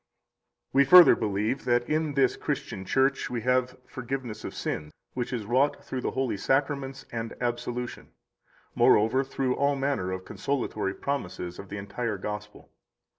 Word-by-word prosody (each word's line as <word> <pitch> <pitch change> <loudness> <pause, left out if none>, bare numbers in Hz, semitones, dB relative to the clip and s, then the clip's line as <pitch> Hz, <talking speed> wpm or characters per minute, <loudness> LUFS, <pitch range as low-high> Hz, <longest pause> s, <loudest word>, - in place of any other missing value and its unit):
54 - - -1
We 140 - +7
further 180 +5 +9
believe 110 +4 -1
that 120 0 +2
in 155 -2 0
this 135 -2 +3
Christian 95 - -4
Church 135 +6 +1
we 120 -2 -3
have 125 +1 +1
forgiveness 130 -3 -5
of - - -6
sin, 75 - -3 0.2
which 125 -2 -3
is 120 -5 -3
wrought 130 +6 +1
through 130 - -4
the - - -1
holy 130 -5 -1
Sacraments 135 +2 -1
and 115 -1 -4
Absolution, 120 0 -3 0.7
moreover, 115 +6 +4
through 130 -1 -1
all 140 0 +2
manner 135 -9 -1
of 95 0 -5
consolatory 115 -8 -2
promises 90 -10 -4
of 100 - -9
the 105 - -5
entire 105 +2 -3
Gospel. 105 +1 -7
125 Hz, 155 wpm, -27 LUFS, 105-135 Hz, 0.7 s, further